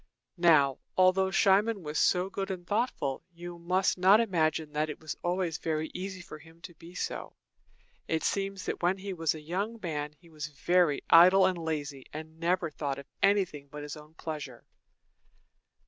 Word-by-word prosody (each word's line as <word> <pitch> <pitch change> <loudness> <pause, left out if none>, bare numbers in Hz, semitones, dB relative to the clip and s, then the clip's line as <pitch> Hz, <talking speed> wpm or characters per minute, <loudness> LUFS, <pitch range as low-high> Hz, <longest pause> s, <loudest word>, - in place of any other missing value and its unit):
Now, 150 -6 +5 0.2
although 185 +1 +4
Cimon 195 +2 +3
was 150 0 -2
so 180 0 +3
good 195 0 -4
and 180 -2 -5
thoughtful, 205 - -1
you 175 0 -9
must 185 +2 +1
not 190 +4 +7
imagine 160 -7 0
that 155 +1 0
it 150 - -6
was 155 -1 -6
always 175 -2 -1
very 155 -1 -2
easy 185 0 -5
for 175 - -10
him 165 +1 -17
to 175 0 -10
be 170 +2 -14
so. - - -4 0.7
It 160 -1 -1
seems 195 -1 -2
that - - -3
when 180 +2 +2
he 195 0 -5
was 165 -3 0
a 155 - -8
young 200 +9 -3
man 150 -5 -4
he 160 +3 -22
was 155 -2 -6
very 155 +1 +1
idle 185 +3 +8
and 185 -1 +2
lazy, 145 -4 -4
and 160 +1 -9
never 170 -1 0
thought 140 -2 -3
of 140 - -9 0.2
anything 190 -8 +2
but 150 +1 -8
his 145 - -6
own 150 +1 -14
pleasure. 150 -7 -7
170 Hz, 180 wpm, -29 LUFS, 155-185 Hz, 0.7 s, idle